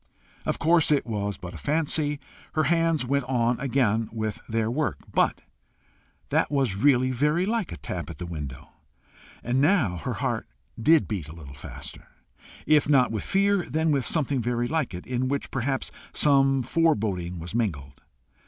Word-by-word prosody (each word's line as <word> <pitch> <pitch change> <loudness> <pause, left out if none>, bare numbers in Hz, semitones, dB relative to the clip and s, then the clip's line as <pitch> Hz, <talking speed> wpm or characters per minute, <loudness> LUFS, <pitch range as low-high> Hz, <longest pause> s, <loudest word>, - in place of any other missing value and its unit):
Of - - 0
course 165 -1 +4
it 145 -2 +3
was 105 -3 -2
but 90 -1 -8
a - - -8
fancy! 150 -1 0 0.3
Her 155 - +2
hands 165 -2 +2
went 140 +2 +1
on 120 -2 +1
again 120 -5 +1
with 110 -1 -3
their 115 0 0
work. 150 +5 -1 0.2
But - - +2 0.9
that - - +2
was 135 -9 +1
really 130 +3 +3
very 150 +8 +1
like 220 -3 -1
a 85 - -6
tap - - -5
at - - -8
the 90 - -5
window! 75 -6 -7 0.7
And 125 +3 +1
now 145 - +3
her 80 - -3
heart - - -2 0.3
did 155 +5 +5
beat 90 -9 -4
a 80 - -9
little 70 -5 -10
faster, 70 - -9 0.6
if 150 -1 +4
not 130 -5 +4
with 110 -3 -2
fear, 200 -3 +1
then 160 +4 +1
with 140 -3 +1
something 140 -5 +1
very 120 +1 0
like 155 - -1
it, 90 - -8
in 125 +1 -1
which 140 +1 -2
perhaps 135 +1 -2 0.2
some 135 -2 +4
foreboding 105 - 0
was 85 +3 -7
mingled. 75 - -2
130 Hz, 170 wpm, -26 LUFS, 105-150 Hz, 0.9 s, did